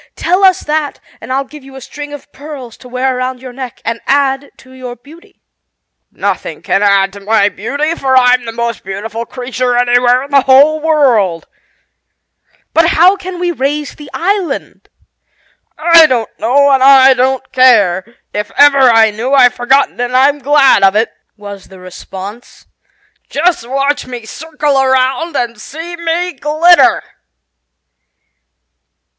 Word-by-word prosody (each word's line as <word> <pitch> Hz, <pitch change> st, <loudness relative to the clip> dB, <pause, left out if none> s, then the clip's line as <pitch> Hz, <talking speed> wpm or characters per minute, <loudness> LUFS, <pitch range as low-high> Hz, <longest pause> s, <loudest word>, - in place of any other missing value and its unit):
Tell 365 Hz, +3 st, 0 dB
us 375 Hz, -2 st, +4 dB
that 300 Hz, -1 st, -3 dB, 0.2 s
and -, -, -9 dB
I'll 270 Hz, +1 st, -1 dB
give 295 Hz, +1 st, -14 dB
you 270 Hz, 0 st, -14 dB
a -, -, -9 dB
string 290 Hz, +3 st, -9 dB
of 290 Hz, 0 st, -11 dB
pearls 275 Hz, -5 st, -10 dB
to 255 Hz, -, -15 dB
wear 255 Hz, +1 st, -2 dB
around 255 Hz, 0 st, -4 dB
your 255 Hz, -1 st, -10 dB
neck 255 Hz, -2 st, -9 dB
and 230 Hz, 0 st, -3 dB
add 275 Hz, 0 st, 0 dB
to 260 Hz, -, -19 dB
your 255 Hz, -2 st, -9 dB
beauty." 300 Hz, +8 st, -19 dB, 0.7 s
"Nothing -, -, -4 dB
can 195 Hz, -, 0 dB
add 195 Hz, -1 st, +2 dB
to 200 Hz, -, -10 dB
my 205 Hz, 0 st, +1 dB
beauty, 285 Hz, +11 st, -3 dB
for 265 Hz, -5 st, 0 dB
I'm 250 Hz, -1 st, +3 dB
the 230 Hz, -, -5 dB
most 235 Hz, 0 st, -4 dB
beautiful 215 Hz, +4 st, -6 dB
creature 250 Hz, -1 st, -3 dB
anywhere 245 Hz, +1 st, +2 dB
in 280 Hz, -, -12 dB
the 280 Hz, -1 st, +4 dB
whole 280 Hz, +4 st, +4 dB
world." 250 Hz, -, +1 dB, 1.3 s
"But 330 Hz, 0 st, +3 dB
how 350 Hz, +4 st, +4 dB
can 370 Hz, -2 st, -8 dB
we 350 Hz, 0 st, -2 dB
raise 290 Hz, 0 st, -3 dB
the 295 Hz, -2 st, -13 dB
island?" 365 Hz, -4 st, -3 dB, 0.9 s
"I 330 Hz, 0 st, +5 dB
don't 235 Hz, -5 st, -2 dB
know 280 Hz, +5 st, +2 dB
and 270 Hz, -1 st, +2 dB
I 265 Hz, 0 st, +6 dB
don't 260 Hz, +1 st, -2 dB
care. 210 Hz, -8 st, +3 dB, 0.3 s
If 210 Hz, 0 st, -4 dB
ever 285 Hz, -1 st, +5 dB
I 225 Hz, -4 st, +4 dB
knew 235 Hz, +6 st, -4 dB
I've 250 Hz, -3 st, +5 dB
forgotten, 265 Hz, +1 st, 0 dB
and 245 Hz, +1 st, -1 dB
I'm 280 Hz, +2 st, +2 dB
glad 280 Hz, -5 st, +3 dB
of 195 Hz, 0 st, +3 dB
it," 220 Hz, +2 st, 0 dB, 0.3 s
was 205 Hz, -1 st, -11 dB
the 190 Hz, -1 st, -15 dB
response. 190 Hz, +4 st, -11 dB, 0.6 s
"Just 310 Hz, -6 st, -1 dB
watch 275 Hz, +2 st, -1 dB
me 245 Hz, -3 st, -8 dB
circle 295 Hz, +1 st, -2 dB
around 265 Hz, +5 st, 0 dB
and 235 Hz, -4 st, -3 dB
see 330 Hz, +7 st, -8 dB
me 340 Hz, +1 st, -3 dB
glitter! 320 Hz, +4 st, +3 dB
265 Hz, 155 wpm, -12 LUFS, 235-295 Hz, 1.3 s, I